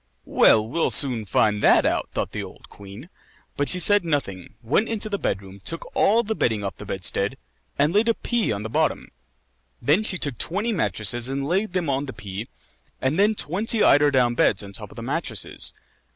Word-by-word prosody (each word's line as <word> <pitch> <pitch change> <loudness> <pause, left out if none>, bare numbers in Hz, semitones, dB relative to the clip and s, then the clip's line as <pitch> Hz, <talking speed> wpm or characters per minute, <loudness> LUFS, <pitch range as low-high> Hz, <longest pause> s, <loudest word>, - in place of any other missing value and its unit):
"Well, 110 0 +4
we'll 165 +8 0
soon 125 -6 +4
find 105 +1 +1
that - - +5
out," - - 0
thought - - -3
the - - -4
old - - -12
queen. 100 - -12 0.5
But 145 - -1
she 180 - +1
said 205 +2 +4
nothing, 135 - -3
went 150 - +1
into 220 -1 -3
the 200 -1 -2
bed 95 +1 -2
room, 95 0 -13
took 165 +12 -5
all 225 +4 +3
the 220 0 -2
bedding 110 - -1
off 95 - -5
the 105 - -10
bedstead, 100 +5 -1 0.4
and 150 +4 +2
laid 215 +3 +3
a 230 - +2
pea 235 - -1
on 100 0 -3
the - - -4
bottom; - - -1 0.7
then 150 - +2
she 205 -3 -1
took 140 -8 -3
twenty 210 +7 -1
mattresses 120 - 0
and 135 +1 -3
laid 190 +4 0
them 180 -3 -1
on 140 +1 -1
the 130 - -6
pea, 100 +3 -7 0.5
and 135 +7 -1
then 210 +2 +3
twenty 210 +7 0
eider 145 +1 +5
down 125 -3 +2
beds 105 -3 +2
on 100 0 -10
top - - -5
of - - -14
the - - -8
mattresses. - - -2
140 Hz, 205 wpm, -23 LUFS, -, 0.7 s, that